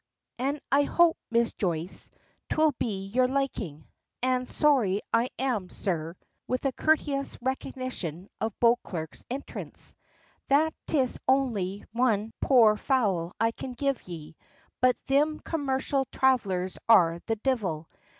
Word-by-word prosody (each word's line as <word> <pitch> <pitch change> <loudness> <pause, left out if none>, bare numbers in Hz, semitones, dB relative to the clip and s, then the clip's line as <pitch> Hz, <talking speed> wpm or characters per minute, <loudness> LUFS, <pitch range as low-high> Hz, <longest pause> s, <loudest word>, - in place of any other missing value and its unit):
"An' 280 +4 0
I 280 +1 +5
hope, 335 +3 +4
Miss 235 0 +2
Joyce, 175 -1 -2 0.4
'twill 310 -1 +3
be 195 -4 -2
to - - -14
your 255 0 +5
liking. 240 - -2 0.4
An' 255 0 +1
sorry 235 -10 +2
I 230 +2 +3
am, 240 -9 -1
sir," 165 -3 -3 0.3
with 255 +2 -2
a 270 - +3
courteous 285 -1 +1
recognition 245 - -4
of 220 -2 -2
Beauclerk's 200 -9 0
entrance, 265 +3 -6 0.5
"that 305 +3 +3
'tis 265 -5 +1
only 215 -8 +1
one 225 -3 +1
poor 225 -5 +6
fowl 200 -10 +1
I 225 +1 +3
can 255 +2 -7
give 275 -2 -2
ye. 160 -2 -8 0.5
But 255 0 +4
thim 295 +3 +1
commercial 270 -3 -1
thravellers 195 -9 +1
are 170 -7 +6
the 225 - +1
divil. 205 - -1
240 Hz, 130 wpm, -28 LUFS, 190-270 Hz, 0.5 s, poor